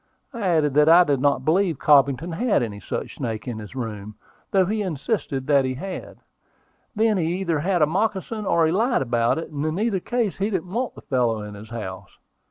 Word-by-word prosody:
I 235 - -6
added 160 -7 +2
that 150 +2 +5
I 175 +2 +8
did 145 -5 0
not 140 -2 +1
believe 170 -1 +2
Cobbington 140 +3 +3
had 215 - +1
any 105 -3 -5
such 90 - -5
snake 110 0 -4
in 115 -3 -4
his 105 +3 -10
room, 105 -4 -6 0.3
though 190 -2 +3
he 215 +3 -1
insisted 155 - -2
that 140 -1 +4
he 130 0 -2
had. 185 +7 -7 0.8
Then 215 -1 +2
he 175 +2 -1
either 170 -5 0
had 175 +1 +1
a - - +7
moccasin, 205 +4 -2
or 165 -1 +3
he 160 - +2
lied 220 - +2
about 120 0 +1
it, 165 - -5
and 145 -1 -3
in 155 +2 -1
either 215 -3 +1
case 235 0 -1
he 200 +2 0
didn't 185 -3 -3
want 245 +2 -2
the - - -11
fellow 120 -5 0
in 105 0 -8
his 105 +2 -11
house. 95 -4 -7
160 Hz, 210 wpm, -23 LUFS, 130-195 Hz, 0.8 s, I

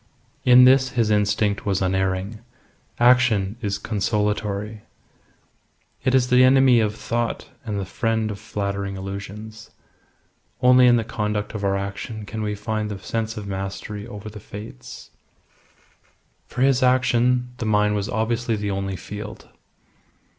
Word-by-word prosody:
In 125 0 +8
this 130 0 +5
his 115 -3 +1
instinct 105 0 +1
was 100 -3 0
unerring. 95 +2 -1 0.6
Action 120 -5 +4
is 100 -3 -1
consolatory. 105 0 -2 1.2
It 130 0 +2
is 125 -1 +3
the 125 +1 +6
enemy 130 -1 +6
of 105 -1 0
thought 120 +3 -3 0.2
and 105 -3 -3
the 95 - -3
friend 110 +1 -1
of 100 - -7
flattering 100 -2 -4
illusions. 100 +3 -8 0.9
Only 125 0 +6
in 120 - +6
the 115 - +1
conduct 105 -2 -3
of 105 -2 -5
our 100 0 +1
action 100 +2 -5
can 110 +1 -5
we 105 -1 -2
find 110 +1 -3
the 105 - -5
sense 110 +2 -4
of 105 - -5
mastery 100 +2 -5
over 105 -2 -9
the 105 0 -9
Fates. 105 - -10 1.4
For 125 - -2
his 135 -2 +3
action, 125 -1 +2
the 115 - -3
mine 105 -1 +2
was 100 -1 -2
obviously 115 +1 -1
the 105 -1 -3
only 95 0 -3
field. 105 +3 -8
105 Hz, 140 wpm, -23 LUFS, 100-120 Hz, 1.4 s, In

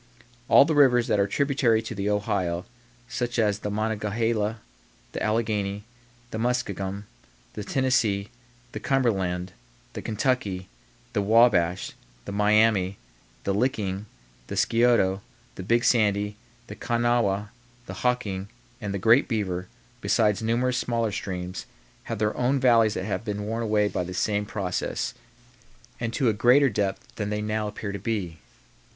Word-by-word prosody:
All - - +8
the 160 - 0
rivers 130 -5 +5
that 105 - +2
are 100 - +3
tributary 130 -2 +2
to - - -5
the 100 0 -2
Ohio, 95 -4 -1 0.4
such 120 0 -3
as 105 -3 +2
the 105 - -4
Monongahela, 110 +1 -1 0.5
the - - -5
Alleghany, 105 -2 -1 0.5
the 110 - -4
Muskingum, 100 -5 -2 0.5
the 105 - -5
Tennessee, 110 -5 +1 0.4
the - - -5
Cumberland, 95 -9 0 0.4
the - - -5
Kentucky, 105 -5 -1 0.5
the 105 - +1
Wabash, 100 -5 +3 0.3
the - - -5
Miami, 105 -2 +3 0.5
the 100 - 0
Licking, 105 -3 -1 0.4
the - - -5
Scioto, 115 -5 +3 0.3
the - - -8
Big 115 +6 +2
Sandy, 105 -3 +2 0.3
the - - -9
Kanawha, 115 -4 0 0.3
the - - -8
Hocking, 105 -6 -1 0.3
and 100 -2 -3
the - - 0
Great 115 +7 +4
Beaver, 95 -6 -2 0.3
besides 105 -1 +2
numerous 120 +3 +1
smaller 115 -3 0
streams, 90 -2 -5 0.4
have 115 - -4
their 105 +1 0
own 130 +2 +1
valleys 115 -4 +4
that 95 - -3
have 105 +1 -2
been 105 -2 -3
worn 115 +2 -2
away 105 -2 +2
by 90 - -2
the 90 +1 -6
same 105 +3 0
process, 95 -4 -2 0.9
and 115 -1 -2
to 130 +1 +1
a 110 - +4
greater 125 +5 +4
depth 100 -1 -3
than 105 -2 -2
they 105 0 -2
now 105 0 -1
appear 105 0 -5
to 100 - -5
be. 95 -8 -3
105 Hz, 145 wpm, -26 LUFS, 100-115 Hz, 0.9 s, All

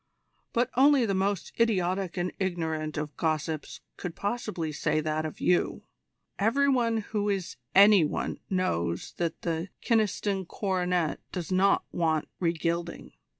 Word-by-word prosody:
"But 245 +1 +1
only 270 -1 +5
the 200 - 0
most 195 0 -1
idiotic 190 -5 +1
and 180 0 -1
ignorant 160 -5 -2
of 150 0 -4
gossips 155 -1 -2 0.2
could 175 -2 -5
possibly 205 -7 -3
say 150 - 0
that 155 +1 -1
of 155 - -10
you. 180 - +1 0.6
Every 245 +7 +3
one 240 -4 +2
who 210 -1 0
is 195 -3 -2 0.2
any 200 -2 +8
one 150 - -2
knows 85 - -1
that 170 -2 -2
the 165 +2 -2 0.2
Kyneston 205 -4 +1
coronet 180 -5 0
does 180 -1 -5
not 195 +2 +3
want 160 -3 0
re 170 -2 +2
gilding." 170 +1 -3
180 Hz, 140 wpm, -28 LUFS, 160-205 Hz, 0.6 s, any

